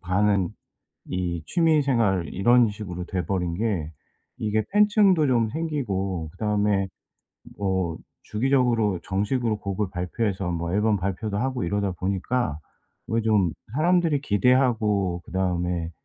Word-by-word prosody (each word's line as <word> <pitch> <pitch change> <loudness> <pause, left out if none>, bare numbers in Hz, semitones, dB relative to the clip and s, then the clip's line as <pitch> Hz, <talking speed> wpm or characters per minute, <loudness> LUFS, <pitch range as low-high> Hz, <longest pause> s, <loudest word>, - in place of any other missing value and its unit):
반은 95 0 +1 0.6
이 90 -3 -2
취미 160 -3 +3
생활 110 -10 +1
이런 120 +5 +4
식으로 95 -4 -6
돼 90 0 -3
버린 90 -2 -1
게 95 -6 -1 0.5
이게 110 0 0
팬층도 205 -5 +4
좀 120 -4 +2
생기고 100 - -2
그다음에 105 0 0 0.7
뭐 95 -4 -1 0.3
주기적으로 115 -4 +1
정식으로 105 +3 -1
곡을 100 0 -2
발표해서 95 +1 -2
뭐 85 0 -3
앨범 105 +1 +2
발표도 100 +2 -3
하고 130 -3 -1
이러다 100 +2 -1
보니까 95 -1 -1 0.5
어 115 +1 +2
좀 105 -6 +2 0.2
사람들이 165 -1 +2
기대하고 105 -7 +2
그다음에 90 -2 -1
105 Hz, 275 characters per minute, -25 LUFS, 90-120 Hz, 0.7 s, 이런